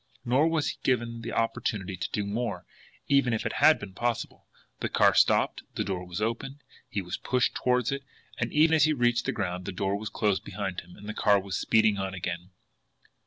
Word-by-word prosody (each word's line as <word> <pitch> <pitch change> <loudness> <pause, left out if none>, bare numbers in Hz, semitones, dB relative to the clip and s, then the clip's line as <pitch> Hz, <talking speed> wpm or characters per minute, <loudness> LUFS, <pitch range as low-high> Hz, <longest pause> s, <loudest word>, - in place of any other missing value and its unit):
Nor 130 +6 +3
was 160 -2 +1
he - - -5
given 115 -2 0
the 115 - -5
opportunity 105 -4 -1
to 90 - -4
do 105 - -1
more, 100 -4 -3 0.4
even 140 -4 +3
had 110 - +4
it - - -14
been 95 - -8
possible. 120 +3 -3 0.3
The - - -2
car - - +4
stopped, - - +3
the - - 0
door 90 -2 -4
was 90 +2 -5
opened, 130 +6 -3 0.3
he 100 - -2
was 90 - -4
pushed 125 -1 +1
toward 125 -1 +1
it 140 0 -2 0.4
and 115 - -1
even 160 +2 +4
as 155 -2 +6
he 155 - +2
reached 120 -3 +1
the - - +2
ground, 90 -3 -3
the - - -3
door 95 +2 -1
was 105 +1 -4
closed 105 -2 0
behind 95 -2 -4
him, 90 - -16
and 105 - -12
the 110 - -3
car 100 -1 +4
was 95 0 -5
speeding 110 -2 +3
on 95 0 -3
again. 85 0 -4
110 Hz, 210 wpm, -28 LUFS, 95-125 Hz, 0.4 s, as